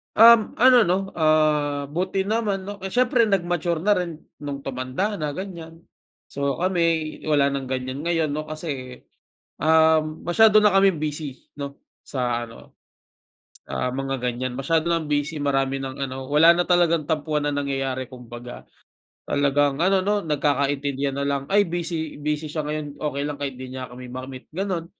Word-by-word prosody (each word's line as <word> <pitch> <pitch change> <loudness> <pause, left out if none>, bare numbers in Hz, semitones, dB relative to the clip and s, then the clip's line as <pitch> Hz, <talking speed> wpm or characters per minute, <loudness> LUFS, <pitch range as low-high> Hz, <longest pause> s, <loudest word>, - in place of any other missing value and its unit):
Um, 230 0 +7
ano, 250 +1 +6
'no, 180 +2 +3
ah 150 -3 +1
buti 185 +4 -1
naman, 210 -2 -1
'no, 200 +1 -7
eh, 190 - -5
siyempre 245 +2 +3
nag-mature 175 -3 0
na 210 - +3
rin 170 -2 -4 0.2
nung 140 -1 -6
tumanda 135 +10 -3
na, 150 -2 -3
ganyan. 170 -3 -8 0.5
So, 140 -1 -1
kami 165 -4 0
wala 145 -2 +3
ng 135 -1 -3
ganyan 130 +1 -3
ngayon, 165 -2 0
'no, 155 +1 -4
kasi, 140 -5 -6 0.6
um, 160 0 +3
masyado 215 +4 +6
na 210 -2 +4
kaming 195 -4 +4
busy, 150 -3 -5
'no, 140 -1 -7 0.2
sa 120 -3 -2
ano, 115 -1 -12 0.9
ah, 125 - -2
mga 135 -2 -2
ganyan 125 +1 -3
masyado 160 +6 0
nang 165 -3 -1
busy 145 +1 -1
marami 135 -1 0
ng 135 +1 -4
ano, 130 0 -6
wala 155 +4 +7
na 175 +1 0
talagang 170 -4 +3
tampuhan 150 -1 0
ang 145 0 -1
nangyayari 135 -1 -2
kumbaga. 125 -1 -10 0.6
Talagang 145 +1 +1
ano, 190 +1 +3
'no, 205 0 +1
nagkakaintindihan 140 -2 0
na 140 - -1
lang, 140 -1 -2
"Ay, 205 +1 +4
busy 165 -3 -4
busy 150 +1 -2
siya 155 +1 -3
ngayon. 150 -1 -5
Okey 145 -2 -2
lang 145 -1 -4
kahit 135 -3 -3
hindi 130 0 -8
niya 130 -1 -6
kami 125 +1 -10
ma-meet." 130 0 -8
Ganon. 185 -2 -2
150 Hz, 160 wpm, -23 LUFS, 135-175 Hz, 0.9 s, Um